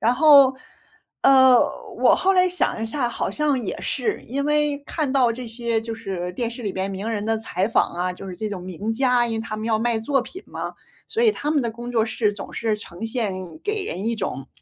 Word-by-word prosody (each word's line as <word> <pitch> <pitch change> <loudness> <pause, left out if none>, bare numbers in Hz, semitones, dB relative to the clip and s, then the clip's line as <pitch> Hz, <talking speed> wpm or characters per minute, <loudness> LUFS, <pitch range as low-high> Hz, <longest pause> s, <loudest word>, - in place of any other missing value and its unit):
然 235 +2 +3
后， 275 -2 +7 0.7
呃， 260 -2 +7 0.4
我 - - +6
后 385 +1 +2
来 365 -1 +4
想 350 -10 0
一 - - -1
下， 245 +1 0
好 - - -2
像 295 -4 0
也 - - -4
是。 430 -3 -2
因 280 +3 -2
为 295 -1 +2
看 295 -5 -1
到 250 -4 +3
这 250 +2 -7
些 230 0 -1
就 225 0 -6
是 185 -5 -5
电 230 +4 -2
视 235 +1 -8
里 200 - -2
边 190 +1 -2
名 200 +4 -4
人 210 -2 -2
的 225 - +1
采 195 -3 -1
访 - - +2
啊， 180 +1 -2
就 190 +1 -9
是 180 - -7
这 215 +4 -3
种 190 -3 -6
名 185 +5 -4
家， 250 -1 +3
因 225 - -2
为 220 - -2
他 220 -1 -5
们 215 +1 -4
要 220 -1 +2
卖 230 0 +1
作 270 +4 +1
品 370 +9 -9
嘛， - - -6 0.3
所 455 - -2
以 445 -3 +5
他 295 - -3
们 300 -2 +2
的 235 -2 -1
工 240 +2 -7
作 225 -2 +2
室 215 -1 0
总 200 -1 -8
是 220 -2 -1
呈 190 0 -9
现 225 -4 -1 0.3
给 420 -1 -1
人 200 - -4
一 235 - +1
种， 190 - -4
230 Hz, 255 characters per minute, -23 LUFS, 215-275 Hz, 0.7 s, 后